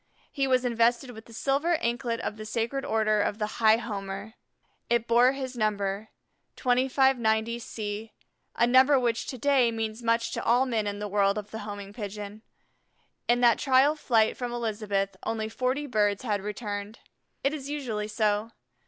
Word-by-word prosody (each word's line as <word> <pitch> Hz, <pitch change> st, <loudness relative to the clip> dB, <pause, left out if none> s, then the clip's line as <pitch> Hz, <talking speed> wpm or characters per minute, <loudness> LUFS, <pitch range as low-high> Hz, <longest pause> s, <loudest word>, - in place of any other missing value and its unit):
He 275 Hz, -2 st, 0 dB
was 255 Hz, -1 st, +2 dB
invested 240 Hz, +2 st, +2 dB
with 220 Hz, -1 st, -12 dB
the -, -, -16 dB
silver 280 Hz, +8 st, +1 dB
anklet 235 Hz, -4 st, -1 dB
of -, -, -3 dB
the 215 Hz, -, -8 dB
Sacred 230 Hz, +5 st, -2 dB
Order 215 Hz, -1 st, +2 dB
of 205 Hz, -, -1 dB
the 210 Hz, -1 st, -4 dB
High 220 Hz, 0 st, +6 dB
Homer. 200 Hz, -2 st, -6 dB, 0.6 s
It 235 Hz, 0 st, +1 dB
bore 245 Hz, +3 st, +5 dB
his 260 Hz, -2 st, -5 dB
number, 210 Hz, -2 st, -1 dB, 0.5 s
2590 245 Hz, -3 st, +2 dB
C, 215 Hz, -1 st, -5 dB, 0.4 s
a 235 Hz, -, +4 dB
number 260 Hz, +3 st, +5 dB
which 235 Hz, -2 st, -1 dB
to 260 Hz, -, -5 dB
day 265 Hz, -1 st, +3 dB
means 225 Hz, 0 st, -4 dB
much 230 Hz, 0 st, +1 dB
to -, -, -3 dB
all 245 Hz, +3 st, +3 dB
men 225 Hz, -5 st, -1 dB
in 205 Hz, 0 st, -3 dB
the 210 Hz, 0 st, -4 dB
world 200 Hz, 0 st, +2 dB
of 210 Hz, 0 st, -6 dB
the 220 Hz, -, -5 dB
Homing 205 Hz, -1 st, -7 dB
Pigeon. 210 Hz, -1 st, -7 dB, 0.9 s
In 240 Hz, +1 st, +3 dB
that 235 Hz, -2 st, +5 dB
trial 270 Hz, +2 st, +4 dB
flight 225 Hz, -7 st, +2 dB
from 245 Hz, -1 st, -4 dB
Elizabeth 210 Hz, -4 st, -2 dB
only 220 Hz, -1 st, -2 dB
forty 255 Hz, +5 st, -1 dB
birds 210 Hz, -5 st, +1 dB
had 210 Hz, -5 st, -1 dB
returned. 205 Hz, 0 st, -5 dB, 0.5 s
It 275 Hz, -, +1 dB
is 280 Hz, -2 st, -6 dB
usually 240 Hz, -8 st, -3 dB
so. 215 Hz, +1 st, 0 dB
230 Hz, 170 wpm, -27 LUFS, 210-250 Hz, 0.9 s, High